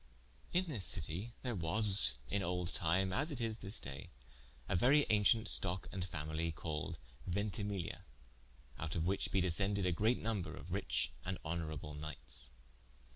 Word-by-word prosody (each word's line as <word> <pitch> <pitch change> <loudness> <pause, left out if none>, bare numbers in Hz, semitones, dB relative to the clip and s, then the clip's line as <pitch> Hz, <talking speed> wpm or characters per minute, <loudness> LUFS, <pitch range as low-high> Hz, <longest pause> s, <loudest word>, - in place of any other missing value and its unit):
In 180 +1 +2
this 135 - -3
citie 85 - +3
there 125 -2 -1
was 95 - +6
in 100 - -1
old 90 -1 -2
time 95 +2 +1
as 145 - 0
it 140 - -5
is 115 -2 -2
at - - -21
this 100 +3 -2
day, 70 0 -8 0.6
a - - 0
verye 135 +10 +5
aunciente 110 +2 +4
stocke 95 -1 -2
and 95 -2 -3
familie 80 -1 -3
called 75 -1 -4 0.3
Ventimiglia, 100 0 -2 0.8
oute 80 0 -3
of 80 -1 0
which 95 +2 0
be 95 - +2
descended 95 +2 +1
a 90 - +2
great 110 +8 +2
nomber 110 -5 -3
of - - -10
riche - - -1
and 95 0 -3
honourable 80 -2 -4
knightes. 75 -4 -9
95 Hz, 160 wpm, -36 LUFS, 80-105 Hz, 0.8 s, was